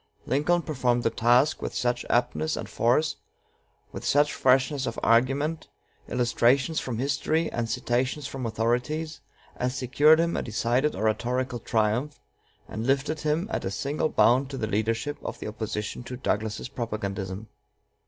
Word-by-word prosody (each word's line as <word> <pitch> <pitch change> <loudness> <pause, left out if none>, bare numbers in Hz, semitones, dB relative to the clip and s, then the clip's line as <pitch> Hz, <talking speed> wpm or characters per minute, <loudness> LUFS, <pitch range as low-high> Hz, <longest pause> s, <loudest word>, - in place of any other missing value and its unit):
Lincoln 155 +7 +1
performed 125 -5 0
the 115 - +2
task 120 +6 +3
with - - -4
such 120 0 -1
aptness 100 -11 +1
and - - -5
force, 130 +7 +1 0.7
with - - -7
such 145 +1 +3
freshness 130 +1 +2
of 115 - -3
argument, 135 +7 +2 0.4
illustrations 125 +5 +2
from 120 -4 -4
history, 145 +5 0
and 115 -1 -2
citations 130 +6 -1
from 130 -4 -4
authorities, 125 +8 -1 0.4
as 125 +1 -1
secured 145 +5 +4
him 170 0 +1
a - - 0
decided 120 +6 0
oratorical 125 +3 -1
triumph, 115 +6 0 0.5
and 110 +3 -4
lifted 140 +3 +1
him 155 +5 0
at - - -2
a - - -2
single 145 +10 -1
bound 130 +1 +3
to 135 - -5
the 115 - -1
leadership 115 +7 -1
of - - -5
the - - -6
opposition 105 0 -4
to 125 - -6
Douglas's 110 -4 -2
propagandism. 105 -4 -4
125 Hz, 145 wpm, -26 LUFS, 115-145 Hz, 0.7 s, secured